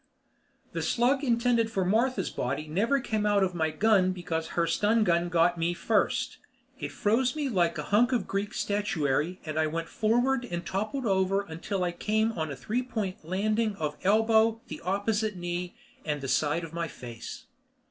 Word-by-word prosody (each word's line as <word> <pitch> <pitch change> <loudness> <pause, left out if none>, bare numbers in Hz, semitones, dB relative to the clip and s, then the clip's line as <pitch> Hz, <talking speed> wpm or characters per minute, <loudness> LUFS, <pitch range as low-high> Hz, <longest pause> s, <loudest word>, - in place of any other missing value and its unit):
The - - -3
slug 260 +4 +2
intended 235 -2 +2
for 195 -4 -1
Martha's 220 +1 +1
body 140 +5 -3
never 220 - +1
came 220 -4 -1
out 205 -1 +3
of 185 -1 0
my 160 -2 0
gun 190 0 +3
because 165 -3 -3
her 170 - +3
stun 215 +6 +2
gun 175 -2 +2
got 175 0 +3
to 175 - -11
me 170 +1 0
first. - - 0 0.4
It - - -4
froze 245 +5 +1
me 295 -3 -1
like 175 -6 +1
a - - -3
hunk 235 +5 +3
of 240 -6 +1
Greek 200 +1 -2
statuary 180 -5 0
and 155 0 -2
I 155 - +2
went 165 +2 -3
forward 245 +4 +1
and 175 -5 -5
toppled 215 +7 -2
over 195 -1 +2
until 185 +1 -4
I 175 - 0
came 220 +5 0
on 160 -7 -3
a 140 - -4
three 215 - -2
point 215 -9 -4
landing 215 +5 0
of 150 -4 -3
elbow, 220 +2 +3
the - - -7
opposite 205 +3 0
knee, 175 0 -4 0.3
and 150 -2 -2
the 135 - -5
side 150 +5 +1
of 165 0 -8
my 170 0 -2
face. 120 -6 -9
195 Hz, 185 wpm, -28 LUFS, 170-220 Hz, 0.4 s, out